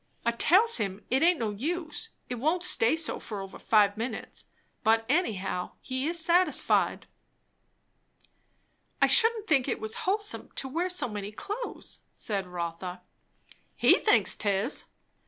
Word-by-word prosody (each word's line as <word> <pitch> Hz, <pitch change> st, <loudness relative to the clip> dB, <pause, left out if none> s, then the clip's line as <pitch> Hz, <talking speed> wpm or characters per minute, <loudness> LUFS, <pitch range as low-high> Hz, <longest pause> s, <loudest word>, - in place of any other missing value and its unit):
I 235 Hz, -, +3 dB
tells 375 Hz, -, +4 dB
him 200 Hz, -2 st, -4 dB
it 260 Hz, -, +2 dB
aint 345 Hz, +1 st, +4 dB
no 225 Hz, -5 st, -2 dB
use; 320 Hz, -, -3 dB, 0.2 s
it 245 Hz, -2 st, -5 dB
won't 325 Hz, +7 st, 0 dB
stay 280 Hz, -7 st, +3 dB
so 325 Hz, -2 st, 0 dB
over 195 Hz, -2 st, -6 dB
five 205 Hz, -2 st, +3 dB
minutes; 230 Hz, 0 st, -5 dB, 0.4 s
but 225 Hz, +1 st, +3 dB
anyhow, 200 Hz, -, -1 dB
he 260 Hz, +2 st, -3 dB
is 340 Hz, +1 st, -1 dB
satisfied." 345 Hz, +2 st, +2 dB, 1.9 s
"I -, -, +6 dB
shouldn't 450 Hz, -2 st, +4 dB
think 280 Hz, -9 st, +2 dB
it 255 Hz, -, -2 dB
was 220 Hz, 0 st, -3 dB, 0.2 s
wholesome 415 Hz, +1 st, -2 dB
to 270 Hz, -, -3 dB
wear 335 Hz, +7 st, -2 dB
so 360 Hz, -8 st, +1 dB
many 205 Hz, -2 st, -6 dB
clothes," 415 Hz, -, -7 dB
said 200 Hz, -4 st, -4 dB
Rotha. 180 Hz, +1 st, -6 dB, 0.7 s
"He -, -, +4 dB
thinks -, -, +3 dB
'tis." 205 Hz, +4 st, -1 dB
250 Hz, 140 wpm, -28 LUFS, -, 1.9 s, I